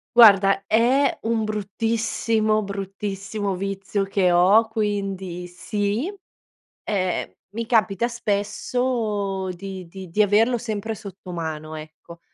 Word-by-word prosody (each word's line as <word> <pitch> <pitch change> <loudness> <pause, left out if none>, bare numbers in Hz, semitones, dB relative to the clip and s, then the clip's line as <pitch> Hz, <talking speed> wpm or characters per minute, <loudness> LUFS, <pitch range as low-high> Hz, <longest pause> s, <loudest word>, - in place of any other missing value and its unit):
Guarda 200 -4 +7
è 250 +7 +3
un 225 -1 +1
bruttissimo, 215 +1 0
bruttissimo 195 0 -4
vizio 195 +1 -2
che 195 -2 +2
ho, 195 +6 +5
quindi 195 -5 -2
sì, 205 - -2 0.7
ehm, 185 -4 -1 0.2
mi 230 +4 -4
capita 220 -1 +2
spesso 210 -2 -1
di 185 0 -6
di 185 +1 -9
di 210 +6 +2
averlo 220 +4 +4
sempre 220 -1 -3
sotto 195 -2 -10
mano, 155 -2 -4
ecco. 155 +2 -11
200 Hz, 105 wpm, -23 LUFS, 190-220 Hz, 0.7 s, Guarda